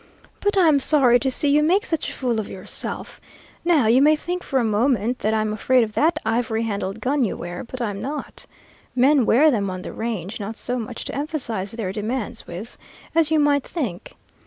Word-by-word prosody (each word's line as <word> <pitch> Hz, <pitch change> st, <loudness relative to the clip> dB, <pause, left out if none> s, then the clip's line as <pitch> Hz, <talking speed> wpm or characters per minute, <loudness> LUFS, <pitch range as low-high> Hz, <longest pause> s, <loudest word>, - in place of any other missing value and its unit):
But 410 Hz, 0 st, 0 dB
I'm 320 Hz, -6 st, +5 dB
sorry 260 Hz, -4 st, +4 dB
to 265 Hz, -, 0 dB
see 285 Hz, +3 st, +1 dB
you 295 Hz, +1 st, +4 dB
make 370 Hz, +8 st, +2 dB
such 325 Hz, -7 st, -1 dB
a -, -, -6 dB
fool 245 Hz, -4 st, -1 dB
of 215 Hz, -, -4 dB
yourself. 185 Hz, -, -4 dB, 0.4 s
Now, 330 Hz, -7 st, +3 dB
you 235 Hz, +4 st, +5 dB
may 305 Hz, +2 st, +6 dB
think 355 Hz, +4 st, -4 dB
for 270 Hz, -, -2 dB
a -, -, +1 dB
moment 230 Hz, +2 st, +1 dB
that 215 Hz, -, 0 dB
I'm 215 Hz, -1 st, 0 dB
afraid 250 Hz, +4 st, +3 dB
of 215 Hz, -1 st, -4 dB
that 325 Hz, +8 st, +2 dB
ivory 225 Hz, 0 st, 0 dB
handled 200 Hz, -1 st, -3 dB
gun 270 Hz, +3 st, +1 dB
you 220 Hz, -, -1 dB
wear, 175 Hz, +1 st, -6 dB
but 255 Hz, +1 st, -6 dB
I'm 205 Hz, -3 st, -3 dB
not. 290 Hz, +3 st, -6 dB, 0.5 s
Men 260 Hz, 0 st, +4 dB
wear 300 Hz, +6 st, +5 dB
them 200 Hz, -6 st, 0 dB
on 185 Hz, 0 st, -5 dB
the -, -, -7 dB
range, 220 Hz, -4 st, -4 dB
not 215 Hz, +2 st, -5 dB
so 250 Hz, 0 st, -2 dB
much 235 Hz, +1 st, -6 dB
to -, -, -5 dB
emphasize 255 Hz, -, -3 dB
their 220 Hz, -5 st, -3 dB
demands 215 Hz, +3 st, -4 dB
with, 185 Hz, +7 st, -8 dB, 0.3 s
as 325 Hz, -2 st, +3 dB
you 315 Hz, -1 st, +3 dB
might 290 Hz, -2 st, +3 dB
think. 235 Hz, -, -5 dB
245 Hz, 205 wpm, -22 LUFS, 215-290 Hz, 0.5 s, may